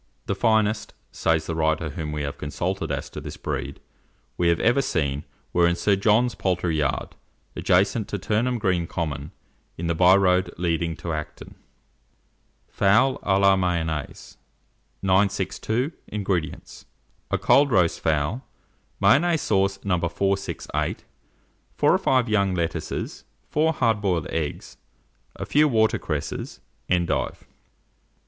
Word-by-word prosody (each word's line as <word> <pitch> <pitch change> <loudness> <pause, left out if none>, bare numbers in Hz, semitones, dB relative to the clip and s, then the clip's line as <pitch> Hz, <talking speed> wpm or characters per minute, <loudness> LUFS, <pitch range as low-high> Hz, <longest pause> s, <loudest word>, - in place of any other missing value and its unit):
"The - - -1
finest," 110 0 +1 0.2
says 80 -1 0
the 80 - -3
writer 80 0 0
whom 75 0 -5
we 75 -1 -3
have 70 0 -5
consulted 80 +3 -3
as 70 -1 -3
to - - -7
this - - -8
breed, - - -4 0.6
"we 85 - +1
have 85 0 +3
ever 120 +4 +3
seen, 70 - -1 0.3
were 85 -1 +4
in 85 - +1
Sir 100 +3 +2
John's 110 +5 +3
poultry 90 -4 -1
yard, 70 -4 -1 0.5
adjacent 100 +4 +2
to 105 - -3
Turnham 115 +5 0
Green 90 -5 0
Common, 75 -4 -4 0.5
in 85 - -4
the 85 - +1
byroad 90 +1 +4
leading 85 -1 -1
to 85 +2 -5
Acton." 75 -1 -7 1.1
FOWL 105 +7 +3
A 95 -1 +2
LA 100 0 +5
MAYONNAISE. 85 -5 -3 0.7
962. 100 - +1 0.2
INGREDIENTS. 95 -7 -4 0.4
A - - +1
cold 140 +1 +4
roast 90 -8 +2
fowl, 80 - 0 0.6
Mayonnaise 150 - +4
sauce 95 -1 +1
No. 90 -3 +1
468, 95 +3 -2 0.7
4 - - +3
or - - +4
5 130 -2 +2
young 100 -4 +1
lettuces, 85 -2 -3 0.3
4 160 +2 +2
hard 115 -7 +1
boiled 90 -6 0
eggs, 80 -3 -4 0.6
a - - -5
few 150 +1 +4
water 110 -5 +2
cresses, 75 -2 -4 0.3
endive. 85 -2 0
95 Hz, 130 wpm, -24 LUFS, 80-105 Hz, 1.1 s, LA